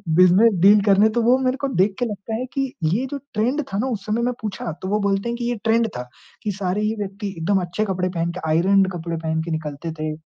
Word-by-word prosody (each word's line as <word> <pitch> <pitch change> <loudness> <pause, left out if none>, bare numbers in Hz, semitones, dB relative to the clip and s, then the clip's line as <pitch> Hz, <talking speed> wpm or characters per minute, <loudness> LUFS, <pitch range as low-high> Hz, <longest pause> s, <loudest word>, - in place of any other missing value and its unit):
Business 185 +6 +6
deal 205 +2 +7
करने 200 +1 +4
तो 235 - +3
वो 245 +3 +4
मेरे 260 0 0
को 275 - 0
देख 195 +2 +2
के 245 - +1
लगता 210 0 -5
है 250 - -3
कि 270 -2 -1
ये 200 +12 +1
जो 285 - -2 0.2
ट्रेंड 245 +8 +1
था 195 - 0
ना 250 - 0
उस 220 -6 -4
समय। 215 +2 0
मैं 245 +1 0
पूछा, 195 -5 -4
तो 185 - -4
वो 210 +2 +1
बोलते 200 +2 0
हैं 235 - -2
कि 240 - -3
ये 240 - -1
ट्रेंड 230 0 +3
था 125 - -6 0.4
कि 210 - -1
सारे 195 0 -2
ही 215 +1 0
व्यक्ति 200 +1 -4
एकदम 185 +4 +1
अच्छे 180 +5 -2
कपड़े 185 -2 -1
पहन 170 -1 -2
के, 180 - -7
आयरन्ड 190 +4 +3
कपड़े 170 -1 -4
पहन 160 0 -1
के 170 - -5
निकलते 155 0 -4
थे। 155 0 -2
200 Hz, 255 wpm, -22 LUFS, 180-225 Hz, 0.4 s, deal